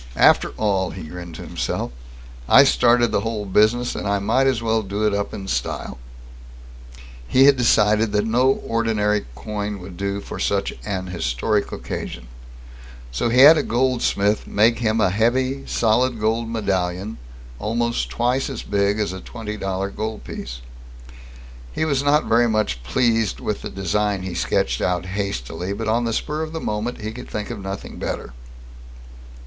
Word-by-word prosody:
After - - +5
all, 95 -4 +1
he 95 - -8
grinned 85 +1 -8
to - - -8
himself, - - -3 0.6
I 135 - +9
started 120 -3 +4
the - - +2
whole 110 -2 -3
business, 110 +5 +2
and - - -4
I 100 0 +2
might 115 +7 +2
as 130 -4 +2
well 115 -1 +1
do 100 +1 -2
it 105 - +2
up 100 0 -1
in 95 - -7
style. - - -3 1.3
He 130 - +5
had 140 -1 +7
decided 110 -3 +3
that 105 +1 +1
no 125 +4 +3
ordinary 110 - 0
coin 105 - -4
would 90 -1 -10
do 100 0 -2
for - - -8
such 100 -1 0
an 95 -3 -3
historic 90 - -1
occasion. - - -6 0.8
So 60 - 0
he 125 +3 +5
had 155 +3 +9
a - - +2
goldsmith 120 -5 +1
make 115 +2 +3
him 110 -1 +1
a 95 - +3
heavy 130 +6 0
solid 120 +2 +1
gold 115 +2 0
medallion 95 -2 -2 0.4
almost 115 - -1
twice 125 +3 0
as 130 -4 -5
big 100 +1 +1
as 105 -3 -1
a 95 - -7
twenty 110 -3 -6
dollar 95 -1 -3
gold 110 +1 -5
piece. - - -7 1.1
He 160 - -1
was 140 -3 +1
not 145 +2 +3
very 120 +1 +3
much 110 - 0
pleased 115 - +1
with 105 - -3
the - - -5
design 100 0 -1
he 95 -1 -4
sketched - - 0
out 90 -1 0
hastily, 90 -2 -3
but 110 +2 -4
on 115 +2 +1
the 115 - -1
spur 150 +6 -2
of 160 0 -4
the 160 - -3
moment, 110 -1 -3
he 110 +1 -4
could 125 +2 -9
think 105 +2 -4
of 115 - -6
nothing 95 0 -6
better. - - -4
105 Hz, 170 wpm, -22 LUFS, 100-120 Hz, 1.3 s, I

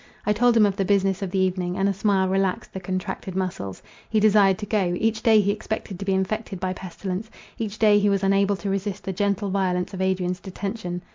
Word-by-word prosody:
I 210 - +3
told 235 +2 +3
him 215 - +6
of 200 -1 0
the 195 - +1
business 195 0 +1
of 195 - -2
the 190 - -2
evening, 185 -1 0
and 195 0 +2
a 200 - +1
smile 195 -1 +1
relaxed 190 0 -1
the 190 - -4
contracted 185 0 -4
muscles. 180 - -4 0.3
He 220 - +2
desired 205 -3 +5
to 210 - -5
go; 190 -4 0
each 220 +1 0
day 220 -2 +5
he 200 0 +1
expected 210 -2 -5
to 195 - -5
be 195 -1 +1
infected 195 +1 -2
by 185 0 -1
pestilence, 190 +3 -5 0.3
each 215 -2 -3
day 210 -2 +5
he 205 0 +2
was 200 -1 +1
unable 195 +1 +3
to 200 +1 -4
resist 195 0 -3
the 190 - -3
gentle 200 +1 0
violence 180 -2 0
of 190 - -4
Adrian's 185 -1 0
detention. 190 -2 -5
195 Hz, 225 wpm, -24 LUFS, 185-205 Hz, 0.3 s, him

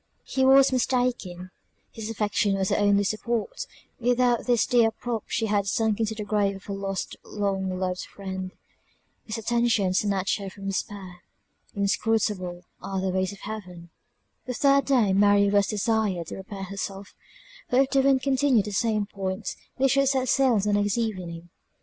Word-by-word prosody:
He 265 - -1
was 270 +1 +6
mistaken; 245 -8 -1 0.4
his 220 -1 -6
affection 210 -2 0
was 190 -1 0
her - - +2
only 205 0 +3
support; 235 - -2 0.3
without 245 0 +2
this 240 -2 +3
dear 235 -2 +4
prop 225 0 -4
she 225 - -1
had 205 -2 0
sunk 220 +1 +1
into 220 -1 -1
the 215 - -4
grave 205 -1 0
of 195 - -11
her 200 - -5
lost 195 -1 -4
long 195 -3 -2
loved 185 -1 -3
friend; 190 -1 -6 0.8
his 220 +1 -4
attention 230 -4 +1
snatched 195 0 0
her 195 -1 -5
from 195 +1 -11
despair. 195 -1 -4 0.6
Inscrutable 200 -3 0 0.2
are 195 -1 -3
the 190 0 -1
ways 185 +1 0
of 200 - -12
Heaven! 180 -6 -8 0.6
The 250 - -3
third 275 +1 +4
day 240 -8 +3
Mary 200 0 +4
was 200 -1 +3
desired 210 -4 0
to - - -6
prepare 195 0 -7
herself; 195 0 -6 0.6
for 250 - +3
if 275 - 0
the 275 - +4
wind 265 -1 +3
continued 265 -5 +3
in 210 - -5
the - - -7
same 215 0 +1
point, 195 0 -4 0.2
they 270 - +3
should 275 +1 +3
set 260 -2 0
sail 265 -4 +4
the 205 +1 +1
next 205 +1 +1
evening. 180 -7 -4
205 Hz, 170 wpm, -26 LUFS, 195-235 Hz, 0.8 s, was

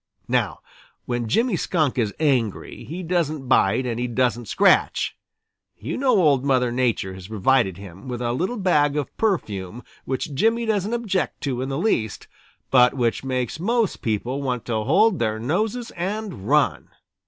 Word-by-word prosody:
Now - - 0 0.4
when 120 -2 -2
Jimmy 230 - +2
Skunk 155 -7 0
is 110 -3 +1
angry, 130 -9 -1
he 175 +6 -6
doesn't 160 -5 -1
bite 130 0 +3
and 120 -1 -2
he 125 - -1
doesn't 120 -1 0
scratch. - - +2 0.6
You 120 +10 -4
know 255 -6 +3
Old 145 -7 +3
Mother 130 -3 +2
Nature 120 -6 0
has 95 -1 -10
provided 110 -2 +2
him 95 +2 -11
with 125 -2 -4
a 120 -1 -1
little 185 - -2
bag 150 -7 +2
of 145 - -3
perfume 115 - -2 0.2
which 135 +3 -3
Jimmy 225 - +2
doesn't 215 0 0
object 210 -6 -2
to 130 -5 -2
in 130 - -3
the 135 - -2
least, 130 - -1 0.4
but 125 -1 +5
which 120 -2 0
makes 130 +1 -2
most 225 +3 0
people 120 +5 -2
want 125 -4 -2
to 110 -2 -1
hold 190 - +3
their 110 -2 0
noses 210 - -2
and 190 - -4
run. - - +2
135 Hz, 165 wpm, -23 LUFS, 120-185 Hz, 0.6 s, but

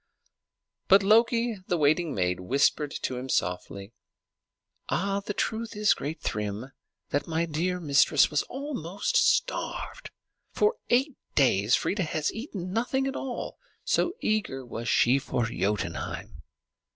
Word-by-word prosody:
But 195 +1 +6
Loki, 230 +2 +3
the 175 - +1
waiting 155 +1 +2
maid, 90 -2 0
whispered 140 +8 +1
to 130 - -2
him 130 +1 -6
softly, 95 +2 -2 1.0
"The 200 +1 -1
truth 225 0 -2
is, 210 0 +4
great 150 +4 -5
Thrym, 105 +5 -3 0.4
that 145 - 0
my 165 0 0
dear 170 +3 -1
mistress 145 -2 +4
was 150 - +2
almost 250 - -3
starved. - - 0 0.4
For 430 +2 +2
eight 260 +3 +2 0.2
days 110 -5 +4
Freia 205 - -1
has 155 -3 -1
eaten 195 - -6
nothing 255 +4 0
at 270 - -2
all, 255 -3 -5 0.2
so 350 - +1
eager 205 -12 -1
was 115 -1 -5
she 130 +3 +4
for 120 -3 -1
Jotunheim." 105 -2 -3
170 Hz, 125 wpm, -27 LUFS, -, 1.0 s, But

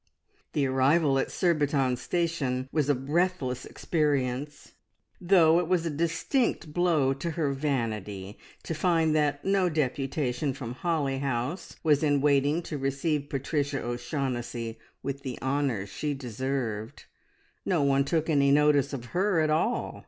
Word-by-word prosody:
The 145 - +1
arrival 135 +2 +3
at - - -1
Surbiton 145 -7 +1
Station 140 -5 -1
was 150 -3 0
a 145 - +4
breathless 140 -2 -1
experience, 145 -3 -1 0.5
though 170 -3 +5
it 175 - -1
was 175 -2 +1
a 165 - -1
distinct 165 - 0
blow 160 -6 +2
to 140 +5 -4
her 145 -4 +1
vanity 110 -8 -3 0.2
to - - -3
find 160 -1 +2
that 145 -2 +1
no 195 -2 +2
deputation 135 -2 -1
from 125 -4 -6
Holly 140 -2 -1
House 135 +5 -3
was 150 -3 +4
in 145 -2 +3
waiting 145 +3 +2
to 150 -3 -5
receive 140 +2 -1
Patricia 140 +1 -1
O'Shaughnessy 120 -2 -3 0.2
with 140 +1 -4
the 130 -3 -5
honours 130 -7 -1
she 150 -1 -3
deserved. 125 -3 -4 0.6
No 170 -6 +1
one 140 0 +3
took 160 +2 0
any 140 -3 +3
notice 145 -1 +4
of 125 -3 -5
her 190 -1 +2
at 155 -1 +2
all. 155 - 0
140 Hz, 140 wpm, -28 LUFS, 130-160 Hz, 0.6 s, though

